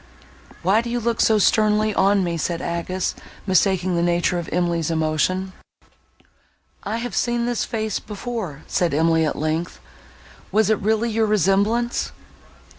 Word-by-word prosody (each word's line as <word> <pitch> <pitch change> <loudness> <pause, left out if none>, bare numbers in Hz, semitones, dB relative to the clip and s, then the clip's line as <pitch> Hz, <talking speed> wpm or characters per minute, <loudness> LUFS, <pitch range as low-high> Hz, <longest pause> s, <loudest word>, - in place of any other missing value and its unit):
"Why 195 +6 +3
do 235 - -6
you 240 +1 -1
look 235 0 0
so 220 - +4
sternly 215 +1 +3
on 200 0 +3
me?" 170 -1 -1
said 170 +1 -2
Agnes, 170 +2 -2 0.3
mistaking 185 -1 +2
the 170 - +1
nature 175 +1 +1
of 170 - -6
Emily's 170 -2 0
emotion. 165 +4 0 1.3
"I 215 +3 -3
have 245 +1 -5
seen 240 -1 0
this 240 -1 -1
face 220 -2 -2
before," 210 - -6
said 170 -5 0
Emily, 160 0 +3
at - - -2
length; 155 +3 -2 0.7
"was 220 0 +3
it 215 - +2
really 220 +3 0
your 220 0 +1
resemblance?" 210 +4 +1
195 Hz, 145 wpm, -22 LUFS, 170-220 Hz, 1.3 s, so